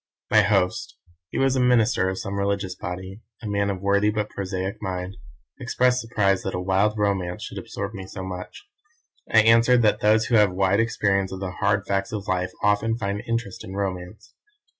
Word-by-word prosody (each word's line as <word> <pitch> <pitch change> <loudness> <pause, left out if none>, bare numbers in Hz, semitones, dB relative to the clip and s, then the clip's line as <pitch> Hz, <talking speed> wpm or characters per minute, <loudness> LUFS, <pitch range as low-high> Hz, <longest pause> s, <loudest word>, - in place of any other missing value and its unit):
My 110 0 +7
host 100 +3 0 0.3
he - - -5
was 135 0 +2
a - - +1
minister 120 -5 +3
of 95 - -4
some 100 +1 -4
religious 100 -1 -1
body, 95 +2 -7 0.2
a - - -4
man 100 -1 0
of 95 -2 -3
worthy 100 +1 +3
but 105 0 -2
prosaic 95 0 -4
mind 95 -1 -4 0.4
expressed 125 +1 +1
surprise 100 -4 +1
that 95 - -4
a - - -2
'wild 95 +4 +1
romance' 95 -4 -1
should - - -6
absorb - - -6
me 95 -2 -7
so 95 - -7
much. 95 - -8 0.7
I 110 - +7
answered 115 +2 +5
that 105 - +3
those 110 +1 +4
who 120 - +1
have 105 -3 +4
wide 95 +2 +2
experience 100 -4 +1
of 95 - -6
the 95 -1 -4
hard 100 +1 0
facts 100 0 -1
of 105 -3 -5
life 90 0 0
often 105 +3 +2
find 100 -2 -3
interest 115 -4 -3
in 95 - -8
romance. 100 +2 -5
100 Hz, 190 wpm, -24 LUFS, 95-110 Hz, 0.7 s, My